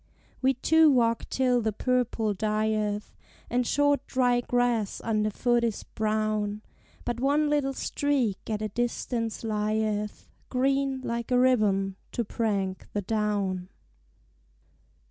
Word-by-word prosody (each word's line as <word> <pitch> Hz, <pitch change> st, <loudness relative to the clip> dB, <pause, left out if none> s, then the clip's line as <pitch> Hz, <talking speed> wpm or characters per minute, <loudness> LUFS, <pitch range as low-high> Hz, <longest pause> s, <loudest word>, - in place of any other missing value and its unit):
We 265 Hz, 0 st, +3 dB
two 320 Hz, +5 st, +5 dB
walk 230 Hz, -4 st, +2 dB
till 250 Hz, -2 st, +2 dB
the 220 Hz, -1 st, 0 dB
purple 235 Hz, -2 st, 0 dB
dieth, 215 Hz, 0 st, -1 dB, 0.4 s
And 245 Hz, 0 st, +1 dB
short 285 Hz, 0 st, +2 dB
dry 245 Hz, -2 st, +2 dB
grass 245 Hz, -4 st, 0 dB
under 215 Hz, -1 st, +1 dB
foot 240 Hz, +3 st, +1 dB
is 230 Hz, -3 st, -1 dB
brown, 215 Hz, -1 st, -1 dB, 0.4 s
But 240 Hz, -1 st, -2 dB
one 290 Hz, +3 st, +2 dB
little 280 Hz, -2 st, +1 dB
streak 260 Hz, -11 st, -1 dB
at 215 Hz, -1 st, -2 dB
a 215 Hz, -, -2 dB
distance 235 Hz, 0 st, -2 dB
lieth 215 Hz, -1 st, -1 dB, 0.2 s
Green, 270 Hz, +1 st, +1 dB
like 235 Hz, -2 st, -3 dB
a 250 Hz, -, +3 dB
ribbon, 205 Hz, -7 st, +2 dB, 0.2 s
to 235 Hz, -, -1 dB
prank 200 Hz, -4 st, -2 dB
the 205 Hz, -, -1 dB
down. 200 Hz, -3 st, -1 dB
230 Hz, 125 wpm, -27 LUFS, 210-250 Hz, 0.4 s, two